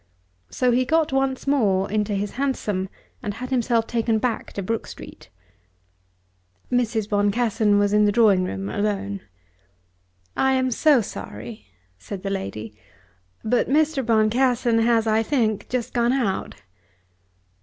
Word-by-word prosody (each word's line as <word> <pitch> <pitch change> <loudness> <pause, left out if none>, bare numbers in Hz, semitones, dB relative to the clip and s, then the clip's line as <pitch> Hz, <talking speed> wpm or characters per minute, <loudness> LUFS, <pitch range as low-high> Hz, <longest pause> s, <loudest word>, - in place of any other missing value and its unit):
So 250 -1 +1
he 250 +2 +3
got 315 +1 +1
once 270 -1 0
more 205 -9 +2
into 210 -1 0
his 200 +1 -2
hansom 215 -8 -2 0.3
and 205 -1 -4
had 255 +3 -7
himself 235 -2 +1
taken 230 -1 0
back 230 +1 -2
to 200 - -4
Brook 225 +4 -3
Street. - - -11 1.4
Mrs. 230 -4 0
Boncassen 210 +1 +2
was 205 0 +2
in 210 0 +4
the 205 - +3
drawing 205 -4 +4
room 95 - -4
alone. 200 - -2 1.1
"I 265 0 +2
am 260 -1 +1
so 285 +1 +4
sorry," 110 - -8 0.3
said 190 - -8
the 195 - -2
lady, 110 - -5 0.7
"but 240 +2 +1
Mr. 300 -1 +2
Boncassen 230 +1 +2
has, 230 0 +3
I 220 0 +2
think, 225 -4 0
just 250 -2 -3
gone 240 0 +2
out." 235 -8 -1
225 Hz, 135 wpm, -23 LUFS, 205-250 Hz, 1.4 s, in